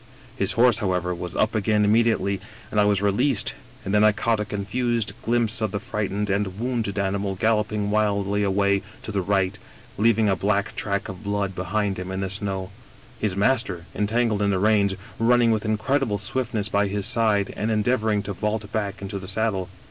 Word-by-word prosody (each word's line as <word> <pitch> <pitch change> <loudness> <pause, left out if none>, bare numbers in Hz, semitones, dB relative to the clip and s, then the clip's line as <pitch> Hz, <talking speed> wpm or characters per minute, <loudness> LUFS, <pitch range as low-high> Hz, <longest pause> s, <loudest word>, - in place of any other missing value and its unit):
His - - 0
horse, 120 -1 +4
however, 90 -4 0
was 90 0 -6
up 110 - +1
again 105 -1 +2
immediately, 105 -3 +2 0.3
and 105 - +1
I 105 - +5
was 100 -1 +2
released, 105 - +2 0.3
and 100 - -2
then 105 0 +5
I 110 - +7
caught 110 +1 0
a 105 - -1
confused 115 +3 -1
glimpse 115 -1 +1
of 110 - +1
the 100 - -3
f - - -11
right 105 -2 0
ened 105 +1 -1
and 100 -1 -1
wounded 115 -4 -2
animal 100 0 -1
galloping 105 0 0
wildly 100 -1 +1
away 100 0 +2 0.2
to - - -5
the 100 -2 0
right, 95 +1 0 0.4
leaving 110 0 +4
a 95 - +3
black 100 +2 0
track 100 -1 -2
of 95 +2 -8
blood 100 -1 -1
behind 95 +2 -1
him 90 0 -5
in 95 0 -3
the 95 -1 -2
snow, 95 -1 -3 0.5
his 105 -4 -1
master, 100 -5 +1
entangled 110 0 +1
in 100 - +2
the 95 - +1
reins, 100 -1 +3 0.2
running 120 0 +4
with 110 0 0
incredible 110 +1 0
swiftness 110 -1 -1
by 100 0 +1
his 100 0 -2
side 105 -3 +2
and 110 - -2
endeavoring 110 -1 +1
to 100 0 -4
vault 105 +2 -3
back 100 -2 -3
into 100 0 -4
the 95 - -8
saddle. 100 -2 -1
105 Hz, 195 wpm, -24 LUFS, 100-110 Hz, 0.5 s, I